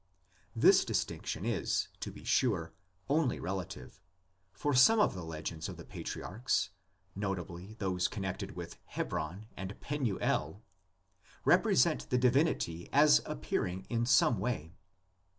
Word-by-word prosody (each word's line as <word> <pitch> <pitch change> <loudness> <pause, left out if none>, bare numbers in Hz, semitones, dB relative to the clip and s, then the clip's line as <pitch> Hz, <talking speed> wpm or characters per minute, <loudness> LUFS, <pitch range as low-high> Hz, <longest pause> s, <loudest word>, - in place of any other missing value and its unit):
This - - +6
distinction - - -2
is, - - 0
to - - -5
be - - -12
sure, 95 -10 +1 0.3
only 145 -2 +1
relative, 95 -2 -6 0.5
for 145 +10 -1
some 175 - +7
of 210 - +4
the 90 -3 -6
legends 80 0 -5
of - - -7
the - - -10
patriarchs 110 -1 -2 0.4
(notably 95 0 -4
those 95 -4 0
connected 95 -3 -4
with - - -8
Hebron 85 +7 -4
and 95 +1 -6
Penuel) 110 - -1 0.8
represent 65 0 +4
the 125 - +2
divinity 125 - +1
as 145 +1 +6
appearing 90 +8 -2
in 115 - +1
the 120 - 0
same 120 -3 +4
way. 95 -7 -3
95 Hz, 125 wpm, -32 LUFS, 90-125 Hz, 0.8 s, some